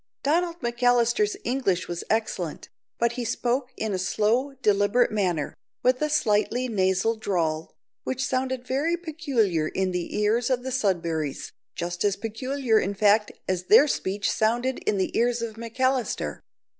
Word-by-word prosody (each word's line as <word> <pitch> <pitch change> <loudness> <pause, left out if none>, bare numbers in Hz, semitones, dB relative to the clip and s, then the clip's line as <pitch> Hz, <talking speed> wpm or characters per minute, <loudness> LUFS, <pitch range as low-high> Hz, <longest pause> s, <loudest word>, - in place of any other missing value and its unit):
Donald 340 +3 +1
McAllister's 240 -3 +2
English 235 -8 0
was 175 0 -4
excellent, 215 -7 -2 0.3
but 235 0 +2
he 245 +1 -4
spoke 245 +3 -1
in 220 -2 -2
a 185 - -1
slow, 220 +9 +1
deliberate 205 +4 +3
manner, 180 -8 0
and - - -20 0.3
with 255 +2 +3
a 305 - +1
slightly 245 -2 +1
nasal 190 0 +1
drawl, 165 -7 -2 0.3
which 260 0 -2
sounded 260 -1 -1
very 295 +7 0
peculiar 270 - 0
in 190 +2 -1
the 180 -1 -3
ears 225 +4 +2
of 250 -1 0
the 260 - -4
Sudberrys, 170 - -1 0.2
just 175 +1 -3
as 200 -1 +2
peculiar, 225 +3 0
in 200 +2 -2
fact, 210 +1 +3 0.2
as 180 -1 -1
their 245 +10 +7
speech 200 -5 -1
sounded 240 +4 0
in 205 - +1
the 190 - -1
ears 240 0 +1
of 225 -1 -4
McAllister. 245 +3 -1
225 Hz, 155 wpm, -25 LUFS, 195-255 Hz, 0.3 s, their